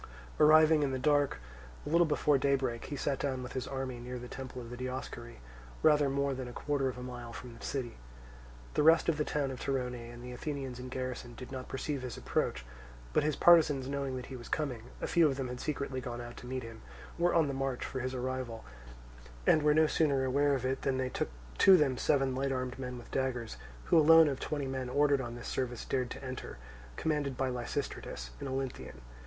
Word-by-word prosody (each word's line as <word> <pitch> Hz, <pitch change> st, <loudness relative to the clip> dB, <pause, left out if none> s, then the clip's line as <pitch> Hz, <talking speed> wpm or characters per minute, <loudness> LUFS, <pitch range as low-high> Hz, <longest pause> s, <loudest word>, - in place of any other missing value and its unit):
Arriving 155 Hz, 0 st, +7 dB
in 145 Hz, -, +2 dB
the 130 Hz, -, -1 dB
dark 145 Hz, +1 st, +2 dB, 0.5 s
a -, -, -4 dB
little 170 Hz, +1 st, +4 dB
before 150 Hz, -2 st, +3 dB
daybreak, 130 Hz, -3 st, 0 dB
he 145 Hz, -, -5 dB
sat 140 Hz, 0 st, -1 dB
down 130 Hz, -2 st, -2 dB
with 125 Hz, -, -7 dB
his 130 Hz, -2 st, -3 dB
army 130 Hz, -2 st, -4 dB
near 125 Hz, +1 st, -6 dB
the 125 Hz, 0 st, -7 dB
temple 130 Hz, 0 st, -7 dB
of 120 Hz, -1 st, -8 dB
the -, -, -5 dB
Dioscuri, 125 Hz, -, -6 dB, 0.4 s
rather 150 Hz, -2 st, +5 dB
more 140 Hz, 0 st, 0 dB
than 130 Hz, -1 st, -5 dB
a -, -, -7 dB
quarter 140 Hz, -1 st, 0 dB
of 125 Hz, -, -6 dB
a 125 Hz, -, -6 dB
mile 120 Hz, -2 st, -7 dB
from 120 Hz, +1 st, -8 dB
the -, -, -13 dB
city. 125 Hz, -, -4 dB, 0.7 s
The -, -, +2 dB
rest 160 Hz, +2 st, +6 dB
of 160 Hz, -, +1 dB
the 150 Hz, -, +1 dB
town 145 Hz, -2 st, -1 dB
of 130 Hz, -, -7 dB
Torone 130 Hz, -2 st, -1 dB, 0.2 s
and 120 Hz, 0 st, -10 dB
the 125 Hz, -, -7 dB
Athenians 135 Hz, -1 st, -4 dB
in 125 Hz, 0 st, -6 dB
garrison 125 Hz, -2 st, -5 dB
did 125 Hz, +2 st, -9 dB
not 130 Hz, -1 st, -6 dB
perceive 135 Hz, +1 st, -3 dB
his 125 Hz, -2 st, -5 dB
approach; -, -, -1 dB, 0.5 s
but -, -, +4 dB
his 150 Hz, -1 st, 0 dB
partisans 150 Hz, -6 st, +5 dB
knowing 140 Hz, -1 st, -2 dB
that 125 Hz, -1 st, -5 dB
he 135 Hz, -, -8 dB
was 120 Hz, -1 st, -9 dB
coming 130 Hz, -7 st, -2 dB
(a -, -, -2 dB
few 170 Hz, -2 st, +4 dB
of 135 Hz, -, -1 dB
them 130 Hz, -2 st, -3 dB
had 125 Hz, 0 st, -5 dB
secretly 140 Hz, -3 st, -3 dB
gone 120 Hz, -1 st, -5 dB
out 120 Hz, 0 st, -7 dB
to 125 Hz, -, -9 dB
meet 130 Hz, 0 st, -3 dB
him) 115 Hz, -1 st, -9 dB, 0.4 s
were 175 Hz, 0 st, +3 dB
on 165 Hz, -3 st, +4 dB
the 140 Hz, -, -2 dB
watch 135 Hz, -1 st, -2 dB
for 130 Hz, -, -4 dB
his 130 Hz, +1 st, -3 dB
arrival, 130 Hz, -2 st, -4 dB, 0.8 s
and 155 Hz, -, +5 dB
were 150 Hz, 0 st, +4 dB
no 160 Hz, 0 st, +6 dB
sooner 140 Hz, -4 st, +2 dB
aware 140 Hz, +2 st, +3 dB
of 130 Hz, -1 st, -3 dB
it 130 Hz, +1 st, -1 dB
than 135 Hz, -1 st, 0 dB
they 130 Hz, -1 st, -1 dB
took -, -, -2 dB
it -, -, -17 dB
to 190 Hz, -1 st, +9 dB
them 140 Hz, -5 st, +2 dB
seven 135 Hz, 0 st, +2 dB
light 135 Hz, +1 st, -1 dB
armed 130 Hz, 0 st, -3 dB
men 125 Hz, -1 st, -5 dB
with 120 Hz, -, -12 dB
daggers, 125 Hz, -, -2 dB, 0.3 s
who 165 Hz, -, +4 dB
alone 160 Hz, +1 st, +8 dB
of 135 Hz, -2 st, -1 dB
twenty 145 Hz, -2 st, -2 dB
men 130 Hz, -1 st, -3 dB
ordered 145 Hz, +1 st, +3 dB
on 120 Hz, -2 st, -5 dB
this 120 Hz, -, -7 dB
service 125 Hz, -3 st, -3 dB
dared 130 Hz, -2 st, -1 dB
to 140 Hz, +2 st, -8 dB
enter, 130 Hz, -, -6 dB, 0.4 s
commanded 145 Hz, -, -1 dB
by 135 Hz, -1 st, 0 dB
Lysistratus 120 Hz, -, -4 dB
an -, -, -5 dB
Olynthian. 130 Hz, -, -4 dB
130 Hz, 225 wpm, -32 LUFS, 125-145 Hz, 0.8 s, to